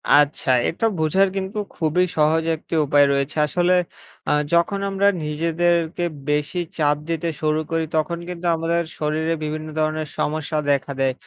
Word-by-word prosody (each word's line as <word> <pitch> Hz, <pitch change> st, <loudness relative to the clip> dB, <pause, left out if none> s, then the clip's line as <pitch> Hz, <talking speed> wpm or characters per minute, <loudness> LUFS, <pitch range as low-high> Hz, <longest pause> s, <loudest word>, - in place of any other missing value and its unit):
আচ্ছা 145 Hz, -1 st, +2 dB, 0.2 s
এটা 185 Hz, +7 st, -2 dB
বোঝার 190 Hz, +5 st, +3 dB
কিন্তু 190 Hz, +2 st, -4 dB, 0.2 s
খুবই 170 Hz, +3 st, +2 dB
সহজ 155 Hz, +2 st, +3 dB
একটি 160 Hz, -, -6 dB
উপায় 145 Hz, 0 st, +5 dB
রয়েছে। 140 Hz, +2 st, -1 dB
আসলে 175 Hz, +3 st, +2 dB, 0.6 s
আ -, -, +3 dB, 0.2 s
যখন 170 Hz, +4 st, +2 dB
আমরা 195 Hz, +1 st, +2 dB, 0.2 s
নিজেদেরকে 165 Hz, +2 st, 0 dB, 0.3 s
বেশি 150 Hz, +4 st, 0 dB, 0.2 s
চাপ 150 Hz, -2 st, +2 dB
দিতে 165 Hz, 0 st, -1 dB
শুরু 155 Hz, 0 st, +1 dB
করি 165 Hz, -1 st, 0 dB
তখন 165 Hz, +2 st, 0 dB
কিন্তু 180 Hz, 0 st, -6 dB
আমাদের 165 Hz, +1 st, 0 dB, 0.2 s
শরীরে 155 Hz, +2 st, 0 dB
বিভিন্ন 155 Hz, +1 st, -4 dB
ধরনের 155 Hz, 0 st, 0 dB
সমস্যা 155 Hz, +1 st, -1 dB
দেখা 140 Hz, 0 st, 0 dB
দেয়। 135 Hz, -1 st, +2 dB
160 Hz, 150 wpm, -22 LUFS, 150-170 Hz, 0.6 s, উপায়